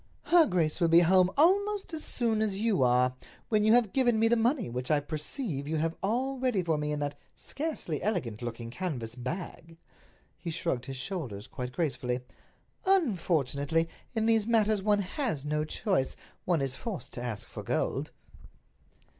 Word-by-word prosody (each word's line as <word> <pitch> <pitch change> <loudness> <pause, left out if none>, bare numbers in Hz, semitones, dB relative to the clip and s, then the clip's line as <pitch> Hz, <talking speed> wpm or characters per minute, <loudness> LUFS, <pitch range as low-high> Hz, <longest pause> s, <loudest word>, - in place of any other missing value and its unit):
"Her 340 -2 +5
grace 170 -2 0
will 170 - +5
be 165 +1 +7
home 185 +1 +5
almost 395 +4 +3
as 310 - -3
soon 225 -3 +1
as 200 -3 0
you 215 -6 +2
are—when 125 - +1
you 215 +1 +5
have 235 -5 +3
given 245 -4 +3
me 225 +1 +4
the 235 - +4
money 240 +3 +1
which 125 +1 -4
I 150 -2 +4
perceive 150 - -2
you 160 - -1
have 165 +1 0
all 255 +6 -1
ready 245 -8 +1
for 165 -2 +1
me 150 0 -2
in 150 - -1
that 145 0 -3 0.2
scarcely 285 - -4
elegant 160 - -2
looking 115 -1 -5
canvas 125 -9 -4
bag." 165 +5 -6 0.6
He 175 - -5
shrugged 160 -6 -2
his 135 -1 -5
shoulders 125 - -5
quite 125 0 -6
gracefully. 130 -5 -1 0.6
"Unfortunately, 165 - +1 0.3
in 220 -1 +1
these 225 -1 +3
matters 215 -3 +3
one 205 0 +2
has 185 - -3
no 150 +1 0
choice—one 170 - -1
is 135 -1 -1
forced 195 - -6
to 120 - -5
ask 115 -4 -4
for - - -8
gold." - - -1
175 Hz, 165 wpm, -29 LUFS, 140-225 Hz, 0.6 s, be